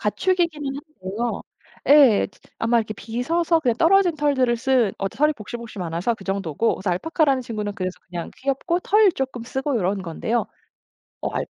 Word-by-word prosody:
가축이기는 320 - 0
한데요. 235 - -5 0.5
예. 275 -8 +7 0.3
아마 230 +1 +2
이렇게 215 -1 -2
빗어서 325 - 0
그냥 240 -5 +1
떨어진 355 0 +4
털들을 260 -5 +2
쓴 240 -4 +2
어 195 - -1
털이 300 +8 +2
복실복실 220 -1 -8
많아서 175 +7 -1
그 195 - -13
정도고 195 +1 0
그래서 190 -1 -2
알파카라는 275 - +1
친구는 210 -3 -4
그래서 185 -3 -4
그냥 170 -1 -5
귀엽고 275 +6 -1
털 420 0 +4
조금 265 -4 -4
쓰고 265 +2 -2
요런 195 -1 0
건데요. 220 +7 -2 0.8
어 - - -1
알 - - -1
240 Hz, 370 characters per minute, -23 LUFS, 205-295 Hz, 0.8 s, 예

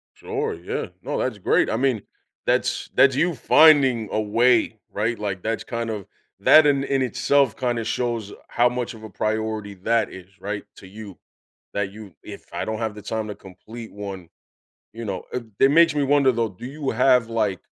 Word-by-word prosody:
Sure, - - -3
yeah, 85 +2 -4 0.2
no, - - -3
that's 125 -5 -2
great, 100 - +2
I - - 0
mean, 125 -4 +1 0.4
that's - - 0
that's 135 -1 +5
you 170 +2 +1
finding 135 -5 +5
a - - 0
way, 110 +1 +2
right, 115 +3 -1
like, 100 -3 -3
that's 115 0 -2
kind 115 -1 -4
of 105 -3 -4 0.3
that 155 0 +7
in 140 -1 +2
in 135 -1 0
itself 130 -1 +2
kind 120 -1 -1
of 115 - -4
shows 115 -4 -2 0.2
how 120 +1 +3
much 125 0 -4
of 110 -1 -13
a 110 - -8
priority 110 -1 -2
that 110 +3 0
is, 95 -1 -11
right, 105 0 -4
to 95 - -12
you, 100 -1 -10 0.6
that 100 -1 -2
you 105 -4 -12
"If - - -10
I - - -3
don't 110 0 -3
have 110 -2 -3
the 105 - -9
time 110 +1 -3
to 105 - -6
complete 110 +4 -11
one," 95 -4 -7 0.6
you 115 +1 -7
know, 100 -4 -4
it 125 - -3 0.2
it 135 - +6
makes 165 +1 +5
me 145 - +1
wonder 140 -1 +4
though, 115 -1 0
do 100 +4 -10
you 140 +1 -4
have, 125 0 +3
like, 105 -5 -1
115 Hz, 195 wpm, -23 LUFS, 105-125 Hz, 0.6 s, that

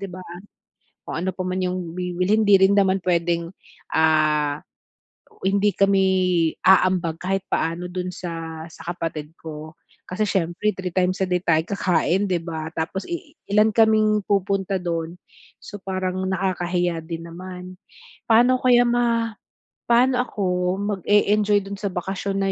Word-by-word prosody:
'di 195 - -5
ba 185 +1 -9 0.9
kung - - -4
ano 190 - 0
pa 185 - -3
yung 180 -2 -2
bibihin 180 +4 +1
'di 195 -2 +6
rin 200 - +2
naman 195 -1 +3
puwedeng, 170 -1 0 0.4
ah, 155 -2 +2 0.9
hindi 200 +1 +2
kami 195 -1 +3 0.6
aambag 185 -3 +3
kahit 190 +1 -1
paano 165 +2 -1
dun 180 0 -4
sa 165 -2 -6
sa 165 +2 -7
kapatid 160 -2 -5
ko. 155 0 -9 0.3
Kasi 200 +4 -1
siyempre 185 +3 0
3 190 -1 -3
times 185 0 +1
a - - -2
day 180 -1 +1
tayo 160 -1 +3
kakain, 185 0 +1
'di 180 -3 0
ba? 160 -2 -5
Tapos 170 +4 -3
i 345 -3 -6
ilan 210 +2 +5
kaming 215 -1 +4
pupunta 195 -1 0
doon, 170 -1 -3 0.4
so 205 - -9
parang 185 -1 -2
nakakahiya 180 -2 -1
din 165 0 -6
naman. 180 +1 -9 0.5
Paano 245 +3 +5
kaya 245 -1 +5
ma 235 -1 +1 0.6
paano 250 +1 +4
ako 205 -5 -4 0.5
mag-e-enjoy 205 +2 +3
doon 200 0 -6
sa 200 - -2
bakasyon 195 +2 -3
na 195 - +1
185 Hz, 140 wpm, -23 LUFS, 170-200 Hz, 0.9 s, di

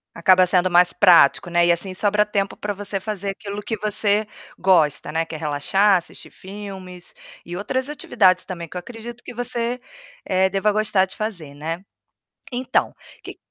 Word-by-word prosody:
Acaba 185 +2 +5
sendo 180 0 +2
mais 175 0 +4
prático, 175 -4 +5
né. 175 0 +3
E 175 - +4
assim 185 +2 -1
sobra 210 +1 +2
tempo 200 -2 -2
para 210 - -4
você 200 0 -4
fazer 200 -1 -4
aquilo 200 +1 -7
que 225 - -3
você 210 0 +1 0.3
gosta, 165 -6 +2
né, 165 +1 0
que 165 - -11
é 155 - -4
relaxar, 175 +7 +2
assistir 175 - -10
filmes 190 -2 -10 0.3
e 175 +1 -6
outras 260 +7 -2
atividades 190 -10 +2
também 170 -3 -6
que 180 - -7
eu - - -2
acredito 235 +5 -10
que - - -9
você, 245 0 -2 0.4
eh, 190 0 +2
deva 200 +2 +1
gostar 210 -2 +2
de 190 - -10
fazer, 175 -10 -5
né. 165 +4 -5 0.7
Então, 250 0 0 0.3
que - - -10
190 Hz, 175 wpm, -22 LUFS, 175-210 Hz, 0.7 s, Acaba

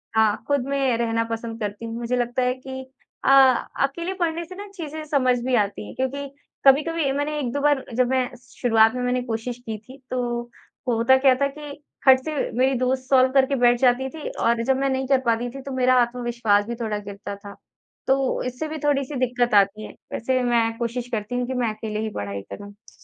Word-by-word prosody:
हाँ, 220 -1 +2
ख़ुद 285 -3 +1
में 270 -4 +1
रहना 230 -1 0
पसंद 225 0 -4
करती 210 +2 -4
हूँ। 225 0 -5
मुझे 240 +1 -1
लगता 245 +1 -1
है 250 0 +2
कि 265 0 -8 0.4
अ - - +4 0.5
अकेले 340 +7 -2
पढ़ने 340 -2 -1
से 370 +2 -11
ना 405 +1 -8
चीज़ें 315 -2 -6
समझ 255 -4 +2
भी 260 - 0
आती 200 - 0
हैं - - -9
क्योंकि 275 +2 -2 0.4
कभी-कभी 290 +1 +4
मैंने 290 +2 -2
1-2 275 0 -2
बार 290 -2 +2
जब 250 -1 +3
मैं 260 -1 +1 0.2
शुरुआत 225 -3 +3
में 250 - -2
मैंने 250 0 0
कोशिश 235 +1 -4
की 220 -1 -4
थी 255 +6 -14
तो 255 -1 -1 0.7
होता 240 +2 +4
क्या 260 -1 +5
था 280 - +4
कि 295 -1 -8 0.3
खट 260 -1 +8
से 310 -1 -3 0.2
मेरी 265 +1 +3
दोस्त 255 +1 -1
सॉल्व 260 -1 +5
करके 270 0 +3
बैठ 240 -1 +4
जाती 260 +1 +3
थी। 315 0 -7
और 230 0 0
जब 265 +2 +2
मैं 275 0 0
नहीं 265 0 -1
कर 270 -2 +4
पाती 235 +1 +1
थी 270 +2 -9
तो 275 - -7
मेरा 255 0 +3
आत्मविश्वास 235 -4 +1
भी 235 - -3
थोड़ा 215 -2 -1
गिरता 200 0 -7
था 200 0 -11 0.5
तो 270 0 +1
इससे 250 +5 -4
भी 315 0 -5
थोड़ी-सी 280 -1 0
दिक़्क़त 245 -2 +1
आती 200 +2 +3
है। - - -9 0.2
वैसे 255 +2 0
मैं 230 -2 +1
कोशिश 240 +1 -3
करती 220 +1 -3
हूँ 245 0 -1
कि 260 - -3
मैं 245 -3 0
अकेले 215 -1 -5
ही 220 - -2
पढ़ाई 100 -1 -4
करूँ। 205 +1 -13
250 Hz, 210 wpm, -23 LUFS, 230-270 Hz, 0.7 s, खट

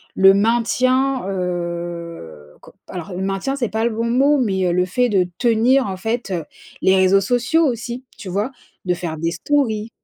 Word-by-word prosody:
le 195 0 +7
maintien, 250 +4 +1
heu, 170 - -5
co - - -16
alors 180 +1 -7
le 185 - -4
maintien 195 +8 -2
c'est 245 -5 -2
pas 220 +1 -1
le - - +2
bon 230 +1 -2
mot, 275 +5 +3
mais 195 -7 0
heu, - - +1
le 180 +1 +2
fait 245 +7 +1
de 190 -4 +2
tenir, 240 +2 +3
en 190 - -4
fait, 225 +1 -3
heu, 170 -4 -2 0.4
les 190 - +4
réseaux 190 +1 +4
sociaux 245 +10 +2
aussi, 240 +1 -4
tu 190 - -8
vois? 205 +8 -1 0.3
De 180 - +1
faire 170 -2 -5
des 165 +2 -1
stories. 220 +1 0
200 Hz, 185 wpm, -20 LUFS, 180-245 Hz, 0.4 s, le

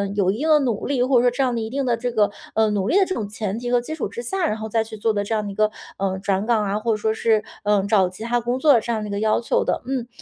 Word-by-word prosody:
有 195 -2 +2
一 205 - -4
定 300 +6 -2
的 305 - +7
努 235 -6 -1
力， 270 -3 +1
或 255 0 +3
者 - - +2
说 245 - +4
这 270 +3 0
样 255 -2 +1
的 235 - -1
一 220 0 -4
定 275 +3 -2
的 240 -2 +1
这 245 +1 -2
个， 210 -3 +2 0.2
呃， 220 -1 +3
努 200 -2 -1
力 335 - +3
的 395 - +5
这 375 - -3
种 215 - -3
前 210 0 -4
提 245 0 -4
和 245 - +4
基 280 +6 -6
础 315 - -3
之 240 - -7
下， 360 +9 -1
然 215 - -1
后 220 0 -6
再 225 +1 +1
去 220 0 -9
做 220 +1 0
的 205 -1 -1
这 225 - -1
样 210 -1 -1
的 200 - -4
一 - - -9
个， 215 0 +3 0.3
呃， 190 -1 -1
转 195 +1 -1
岗 225 -2 +2
啊， 205 +1 -1
或 230 +2 -1
者 - - -1
说 220 +1 0
是， 220 -1 +1 0.2
呃， 205 -1 +3
找 195 -4 +4
其 185 +4 -8
他 240 +1 +1
工 240 +2 -1
作 270 -2 +5
这 230 - -9
样 220 - -2
的 210 - -5
一 - - -5
个 200 - -2
要 215 +2 +2
求 230 - 0
的。 - - -1
嗯 255 -2 -3
220 Hz, 375 characters per minute, -22 LUFS, 210-245 Hz, 0.3 s, 的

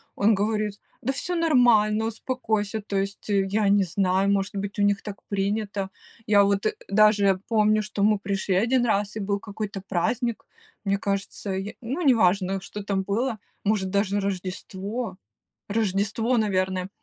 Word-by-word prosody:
Он 210 +2 +4
говорит: 210 0 -1 0.2
"Да 265 +3 0
всё 355 +6 -2
нормально, 235 -9 +4
успокойся". 220 -3 -2
То 200 -1 -3
есть 195 +2 -3
я 200 +1 +2
не 200 0 +4
знаю, 190 +2 +1
может 200 0 0
быть, 200 +1 -4
у - - +3
них 205 0 +2
так 205 -2 -7
принято. 200 0 -1 0.4
Я 205 -1 +5
вот 200 +1 +1 0.2
даже 200 -2 +4
помню, 215 -1 +3
что 210 -1 -4
мы 210 +1 +4
пришли 195 -1 -1
1 240 +5 +3
раз, 205 -2 0
и - - -3
был 200 0 -1
какой-то 205 -1 -5
праздник, 230 +7 -1 0.4
мне 200 0 +2
кажется, 200 0 -3
й 195 +2 -4
ну, 265 +9 -3
неважно, 195 - +3
что 205 +1 -7
там 195 -1 -1
было, 225 +4 -1 0.3
может, 200 -3 0
даже 200 0 +1
Рождество, 195 +2 -4 0.5
Рождество, 215 +3 0
наверное. 185 -3 0
205 Hz, 150 wpm, -25 LUFS, 195-220 Hz, 0.5 s, Я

